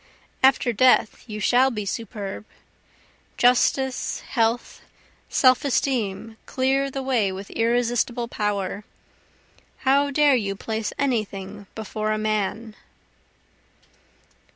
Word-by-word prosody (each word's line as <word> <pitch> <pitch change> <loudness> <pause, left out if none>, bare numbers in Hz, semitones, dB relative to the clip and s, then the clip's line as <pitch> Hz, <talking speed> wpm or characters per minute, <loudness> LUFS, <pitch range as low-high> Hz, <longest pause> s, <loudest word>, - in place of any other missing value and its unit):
after 260 -2 +4
death 250 -1 +3
you 210 0 -5
shall 250 +5 +4
be 210 -5 -4
superb, 205 -1 -5 0.9
Justice, 255 +2 +2
health, 230 -1 -1 0.5
self 255 -2 +4
esteem, 225 -6 -1
clear 270 +1 +1
the 270 0 -5
way 240 -7 +1
with 195 +1 -8
irresistible 240 +1 0
power; 205 -2 -2 1.0
How 280 +2 +3
dare 290 0 +4
you 200 -5 -1
place 220 +1 -3
any 255 -6 +1
thing 200 0 -9
before 215 0 -3
a 215 - 0
man? 215 +1 -2
230 Hz, 105 wpm, -23 LUFS, 210-260 Hz, 1.0 s, after